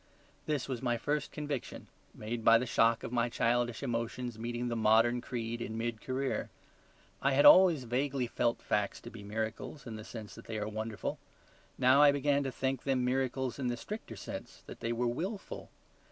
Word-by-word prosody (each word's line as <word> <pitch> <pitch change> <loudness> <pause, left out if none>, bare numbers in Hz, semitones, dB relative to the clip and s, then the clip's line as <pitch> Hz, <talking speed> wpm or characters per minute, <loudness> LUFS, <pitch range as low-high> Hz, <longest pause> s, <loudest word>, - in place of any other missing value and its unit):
This 150 -4 -1
was 130 -3 -3
my 120 -2 +1
first 145 +4 -1
conviction; 145 -4 -5 0.3
made 115 +2 -4
by 115 +1 +7
the 125 - -1
shock 115 -1 +3
of - - -5
my 120 -1 +1
childish 120 +1 0
emotions 120 -1 -3
meeting 120 +1 -3
the 120 - -1
modern 115 +2 +4
creed 120 -1 -4
in 110 -1 -4
mid 115 -1 -3
career. 135 +1 -2 0.7
I 140 0 +2
had 140 - +4
always 175 -7 +8
vaguely 130 +2 0
felt 120 0 -1
facts 105 -1 0
to - - -9
be 110 - -10
miracles 110 +6 -4
in 110 -2 -6
the 110 - -8
sense 110 -2 -8
that - - -12
they 110 - -4
are 105 0 -2
wonderful: 110 -1 -4 0.6
now 130 +2 +5
I 145 -1 +8
began 140 0 +2
to 135 - -1
think 130 0 -1
them 130 -2 +1
miracles 130 0 -1
in 130 - -1
the 120 0 -1
stricter 205 - -7
sense - - -8
that - - -10
they 115 - -2
were 120 +1 0
WILFUL. 180 - -4
120 Hz, 190 wpm, -32 LUFS, 115-135 Hz, 0.7 s, always